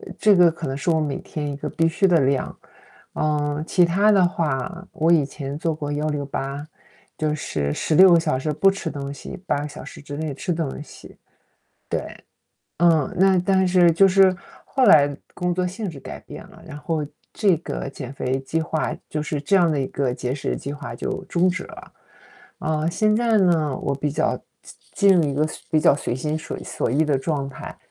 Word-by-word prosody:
呃 - - -11
这 210 -2 +5
个 175 -2 +6
可 165 -1 -6
能 135 - -3
是 145 - -1
我 160 -1 +2
每 145 -3 -2
天 150 -2 -5
一 140 - -5
个 140 - -5
必 165 0 +1
须 175 +4 +2
的 175 -4 +4
量。 135 0 0 0.6
呃， 150 0 -1
其 180 -1 +4
他 195 +5 +3
的 195 -2 +5
话， 170 +2 -3
我 160 +2 +1
以 165 -4 +5
前 140 0 -6
做 165 -1 -1
过 145 -1 -5
168 145 -1 -3 0.5
就 155 -1 -1
是 75 - -2
16 175 - +5
个 170 - +7
小 160 -4 0
时 150 +4 -2
不 195 +6 +3
吃 195 -4 -1
东 140 -1 -5
西， 140 - -9
8 - - +1
个 145 - -4
小 - - -10
时 - - -11
之 145 0 -7
内 155 -1 -3
吃 175 +6 -3
东 160 -4 -3
西。 - - -14 0.7
对， - - -1 0.8
嗯。 170 +3 +3
那 190 0 +5
但 190 +1 +2
是 180 -2 +5
就 195 +4 +5
是 190 0 +5 0.3
后 265 - +1
来 145 -2 +6 0.2
工 180 -1 -1
作 180 +1 0
性 195 +1 -4
质 140 - -11
改 - - -8
变 - - -10
了， - - -16
然 150 -2 -8
后 155 0 -2 0.3
这 200 -4 +3
个 165 - -5
减 135 -2 -7
肥 130 0 -2
计 160 +5 -2
划 160 0 -2
就 150 -1 -2
是 150 -1 -3
这 195 +7 +3
样 175 -3 +4
的 150 - 0
一 135 - 0
个 135 -2 -1
节 125 +1 -3
食 135 - -3
计 140 - -6
划 145 0 -7
就 - - -4
终 175 +1 +1
止 185 0 -1
了。 - - -12 0.7
啊， 155 0 -1
现 215 +5 +2
在 230 0 +2
呢， 165 -8 +2
我 140 - -2
比 145 +2 -2
较 140 - 0 0.6
进 200 -1 +4
进 - - +7
入 170 - +4
一 140 - -2
个 150 +2 +1
随 155 - -8
比 160 - +3
较 150 - +5
随 140 - -3
心 150 +4 -2
所 - - -6
所 - - -3
欲 145 +6 +2
的 145 -3 +1
状 140 0 -2
态。 135 - -9
155 Hz, 225 characters per minute, -22 LUFS, 145-175 Hz, 0.8 s, 个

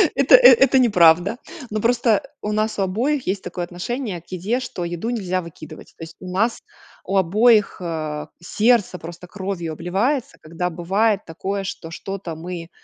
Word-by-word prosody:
это, 275 0 +6
э, - - +9
это 270 - +4
неправда. 180 -2 +4 0.3
Но 215 0 -3
просто 235 -2 +2 0.2
у 210 - -3
нас 215 +1 -1
у - - +2
обоих 250 +9 -1
есть 190 0 -2
такое 180 0 -5
отношение 180 +2 -5
к 175 - -37
еде, 190 +7 -2
что 235 -8 -6
еду 175 +6 -4
нельзя 185 -6 -2
выкидывать. 155 -2 -12
То - - -9
есть, 165 0 -10
у 180 -1 -8
нас 220 +6 0 0.4
у 195 - 0
обоих, 210 +4 +3
э, 155 -3 -4
сердце 210 0 +1
просто 170 +2 -10
кровью 185 -4 -5
обливается, 200 - -1
когда 170 +3 -3
бывает 195 +5 0
такое, 195 +4 -4
что 165 -3 -7
что-то 185 -1 -6
мы, 170 +1 -7
190 Hz, 170 wpm, -21 LUFS, 170-225 Hz, 0.4 s, э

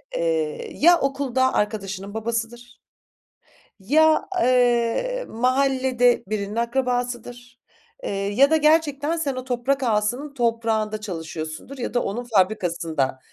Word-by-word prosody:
Eee, - - -1
eee, 475 -2 -2
ya 345 +2 +6
okulda 270 -2 0
arkadaşının 200 -2 -2
babasıdır 235 +2 -4 1.0
ya, 310 +9 +3 0.2
eee, 250 - +2
mahallede 255 0 +2
birinin 205 +1 -3
akrabasıdır, 245 0 -3 0.4
eee, - - -4
ya 205 +8 +2
da 320 - +4
gerçekten 305 0 +2
sen 290 -5 -2
o 255 - -5
toprak 260 +2 -1
ağasının 245 +5 -1
toprağında 225 -3 0
çalışıyorsundur 160 - -6
ya 245 - -4
da 245 - +2
onun 240 +5 -4
fabrikasında 175 - 0
245 Hz, 115 wpm, -23 LUFS, 215-275 Hz, 1.0 s, ya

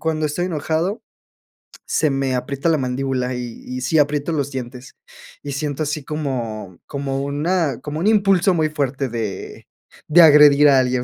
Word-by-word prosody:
cuando 155 -1 -1
estoy 165 +4 -2
enojado 165 +4 -2 0.9
se 155 -2 +2
me 135 -1 -1
aprieta 140 +5 -2
la 160 - +3
mandíbula 130 -1 -2
y 125 -2 -7
y 125 0 -6
sí, 130 +6 0
aprieto 145 +1 +1
los 145 -3 -2
dientes 125 0 -8 0.5
y 145 - -5
siento 145 +1 -3
así 150 -1 -3
como 120 - -5
como 135 -1 -4
una 145 0 -1
como 150 +1 -5
un 175 - -2
impulso 195 -4 +3
muy 155 -2 +1
fuerte 140 -3 -2
de 110 -4 -6 0.4
de 170 +3 +6
agredir 150 -2 +7
a 135 -2 +5
alguien. 125 -1 0
145 Hz, 165 wpm, -20 LUFS, 130-155 Hz, 0.9 s, agredir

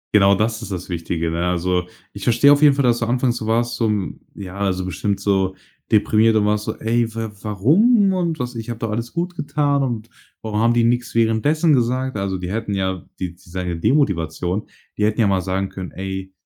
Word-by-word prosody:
Genau, 100 -1 +6
das 110 +2 -1
ist - - -7
das 90 -1 -5
Wichtige, 85 -1 -2
ne? 85 +2 -1
Also, 90 0 0 0.3
ich - - -8
verstehe 120 +4 +5
auf 145 - +1
jeden 145 -2 +6
Fall, 140 - +1
dass 120 -1 +3
du 115 - -1
anfangs 125 0 +1
so 110 - -5
warst, 120 +1 +1
so 115 -2 +1 0.5
ja, 100 0 -3
so 95 0 -3
bestimmt 100 +2 -2
so 95 -1 +1 0.4
deprimiert 110 +1 +4
und 105 -1 +3
warst 105 0 0
so: - - -4
„Ey, 115 0 0
wa 110 -1 -3
warum 190 - +3
und 170 -3 -1
was, 125 -1 -4
ich 115 -1 -7
habe 115 - -4
doch 115 -1 -3
alles 115 +2 -3
gut 175 +1 -3
getan 145 -2 0
und 115 -4 -3 0.3
warum 105 -1 -2
haben 115 +1 +3
die 120 - +3
nix 120 0 0
währenddessen 145 +8 +3
gesagt?“ 130 0 0
Also 95 -2 -2
die 90 0 -5
hätten 105 -1 -2
ja 95 -2 -2 0.2
die 90 -2 -3
die 90 0 -21
sagen 90 0 -4
ja 85 - -2
Demotivation. 90 - 0 0.3
Die - - +2
hätten 105 +1 +1
ja 115 - +4
mal 95 -2 +2
sagen 95 +1 -2
können: 95 -2 -7
„Ey, 95 0 -5
110 Hz, 220 wpm, -21 LUFS, 95-120 Hz, 0.5 s, Genau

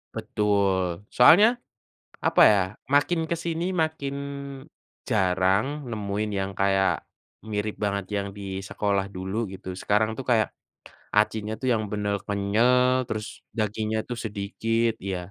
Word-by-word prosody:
Betul. 100 -3 0
Soalnya, 175 - +8 0.8
apa - - +5
ya, 100 -2 +4 0.3
makin 145 +4 +3
ke 170 - +1
sini 170 0 -2 0.2
makin 145 -3 -3 0.9
jarang 95 0 +2 0.2
nemuin 105 0 -2
yang 95 0 -1
kayak 95 0 +2 0.4
mirip 105 0 -2
banget 100 -1 -1
yang 100 0 -2
di 100 - -8 0.2
sekolah 100 0 -1
dulu 95 +3 -4
gitu, 95 -1 -9
sekarang 105 +2 +2
tuh 135 - -6
kayak, 110 -3 +3 0.7
acinya 105 0 +2
tuh 130 - -1
yang 110 -2 0
benar 105 -1 0
kenyal, 125 +6 +3
terus 105 -1 -3 0.3
dagingnya 110 0 -1
tuh 120 -1 -4
sedikit 115 +2 -1
ya, 95 -1 -5
105 Hz, 125 wpm, -25 LUFS, 100-115 Hz, 0.9 s, Soalnya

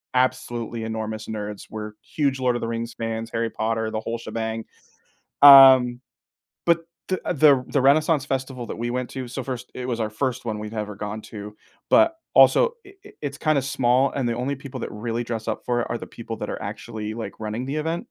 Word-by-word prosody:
absolutely 120 -2 -1
enormous 110 -1 -4
nerds. 105 -1 -6
We're 105 -1 -6
huge 140 -5 -1
Lord 125 -1 +1
of - - -3
the 115 - -2
Rings 115 0 -4
fans, 115 0 -4
Harry 115 0 -1
Potter, 110 0 -2
the 110 - -2
whole 115 +1 -4
shebang, 110 0 -4 0.8
um, 130 -3 +9 0.7
but, 170 -1 +3 0.2
the 185 -1 0
the 140 -4 +5
the 140 - +1
Renaissance 145 +1 +3
Festival 130 -3 -3
that - - -6
we 120 +1 -3
went 125 0 -2
to 130 -2 -6
so, 130 +2 -5
first, 125 -1 -6
it 125 0 -5
was 120 -1 -1
our 110 -1 -1
first 130 +2 -2
one 110 -2 -3
we've 105 +1 -7
ever 105 -1 -4
gone 105 +1 -5
to, 105 0 -9 0.3
but, 330 0 +5 0.2
also, 480 -1 +6
i 395 - -14
i - - -13
it's 145 -1 -4
kinda 155 -4 +2
small, 130 0 +2
and 130 -4 -1
the 115 - 0
only 130 +4 -2
people 135 -1 -8
that - - -5
really 115 +2 -3
dress 115 -1 -4
up 110 - -2
for 120 -1 0
it - - -2
are - - -1
the - - -8
people - - -7
that - - -4
are - - -5
actually, 110 0 -5
like, 115 -1 -5
running 110 +3 -3
the 140 +3 -3
event. 165 +8 -2
120 Hz, 210 wpm, -24 LUFS, 110-135 Hz, 0.8 s, um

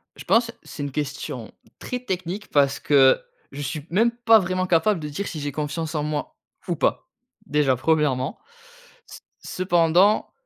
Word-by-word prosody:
Je - - -10
pense, 230 0 +2
c'est 145 - -7
une 140 - -4
question 135 -5 -5 0.3
très 250 - -4
technique. 185 -2 -5
Parce 140 -1 +2
que, 135 -2 +4 0.3
je 140 +1 -7
suis 145 +2 -4
même 225 +7 +3
pas 235 -2 +5
vraiment 185 0 -1
capable 180 +2 +2
de 150 - -5
dire, 200 +8 -4
si 155 - -5
j'ai 145 0 -3
confiance 155 +2 -3
en 150 - 0
moi 150 -1 -4 0.3
ou - - 0
pas. - - -1 0.4
Déjà, 145 -3 +2
premièrement. 140 -2 0 0.7
C - - -12 0.2
cependant 180 +2 +2
160 Hz, 160 wpm, -23 LUFS, 145-185 Hz, 0.7 s, pas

